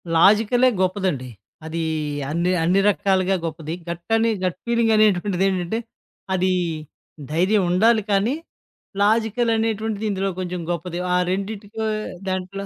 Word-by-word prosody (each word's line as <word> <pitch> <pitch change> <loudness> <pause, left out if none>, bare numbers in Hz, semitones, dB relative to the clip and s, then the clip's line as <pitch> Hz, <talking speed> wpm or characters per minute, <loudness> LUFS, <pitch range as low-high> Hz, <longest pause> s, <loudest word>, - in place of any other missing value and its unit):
లాజికలే 220 +8 +5
గొప్పదండి. 185 -9 -1 0.4
అదీ 165 +1 -3 0.5
అన్నీ 170 +3 +1
అన్ని 180 +4 +3
రకాలుగా 195 -1 +1
గొప్పది. 160 0 -5 0.2
గట్ 170 0 -5
అని 225 0 +2
గట్ 180 -1 -1
ఫీలింగనేటువంటిదేంటంటే, 210 -4 +2 0.5
అదీ 185 0 +2 0.8
ధైర్యం 185 +6 +2
ఉండాలి 220 +5 +4
కానీ, 205 +7 +2 0.7
లాజికలనేటువంటిది 220 0 +1
ఇందులో 195 0 -1
కొంచెం 180 -1 -3
గొప్పది. 175 +1 -4
ఆ - - +3 0.2
రెండిటికో 205 +3 -4 0.4
దాంట్లో 190 +1 -4
195 Hz, 105 wpm, -22 LUFS, 180-220 Hz, 0.8 s, లాజికలే